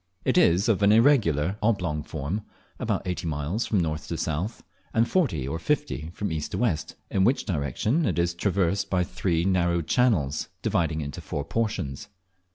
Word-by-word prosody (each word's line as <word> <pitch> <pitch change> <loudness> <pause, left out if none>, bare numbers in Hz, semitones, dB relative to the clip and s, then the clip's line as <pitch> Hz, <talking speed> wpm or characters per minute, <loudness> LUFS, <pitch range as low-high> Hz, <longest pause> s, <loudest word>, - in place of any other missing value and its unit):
It - - +2
is 90 +6 +4
of 105 -4 +2
an 100 0 +5
irregular 105 - +4
oblong 90 -9 +1
form, 80 +7 -4 0.4
about - - -1
eighty 90 -2 -3
miles 80 +8 -2
from 105 - +2
north 80 -2 -2
to 85 - -3
south, 85 +7 -3 0.3
and 115 +1 +4
forty 105 - +1
or 80 +4 -3
fifty 145 - -1
from 100 - -2
east 80 -1 -3
to - - -1
west, 105 -11 -1 0.2
in 95 - +2
which 125 +7 +2
direction 95 - 0
it 95 - -1
is 85 0 +1
traversed 95 +1 0
by 90 -1 +2
three 85 -1 -1
narrow 85 -3 +2
channels, 80 - +1 0.2
dividing 80 -2 0
it - - -3
into 70 - -6
four 70 - -4
portions. 105 -12 -2
90 Hz, 175 wpm, -26 LUFS, 80-105 Hz, 0.4 s, an